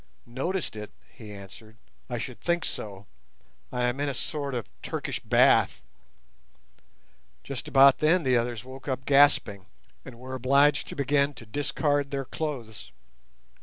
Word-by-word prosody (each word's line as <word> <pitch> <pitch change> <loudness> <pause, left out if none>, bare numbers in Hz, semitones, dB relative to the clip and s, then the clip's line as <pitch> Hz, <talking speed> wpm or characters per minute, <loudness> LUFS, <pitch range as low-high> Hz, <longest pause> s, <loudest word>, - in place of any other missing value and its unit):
"Noticed 135 - -3
it!" 105 -1 -7 0.2
he 110 -5 -12
answered; 105 +3 -12 0.3
"I 120 - -2
should 120 +1 -6
think 175 -1 0
so. 100 -1 -6 0.7
I 125 -1 -1
am 125 +2 0
in 145 0 0
a 135 - -4
sort 140 +1 -3
of 120 - -4
Turkish - - -4
bath." - - +3 1.6
Just 140 -3 -6
about 135 0 +6
then 165 +3 +3
the 130 -2 +3
others 120 -1 -1
woke 130 +2 -11
up 130 -1 -3
gasping, 135 -9 +4 0.4
and 125 -3 -11
were 130 +2 -8
obliged 135 +2 +3
to - - -7
begin 140 0 +1
to 115 - -11
discard 145 +4 -1
their 135 -1 -3
clothes. 125 -9 -6
130 Hz, 145 wpm, -27 LUFS, 120-145 Hz, 1.6 s, about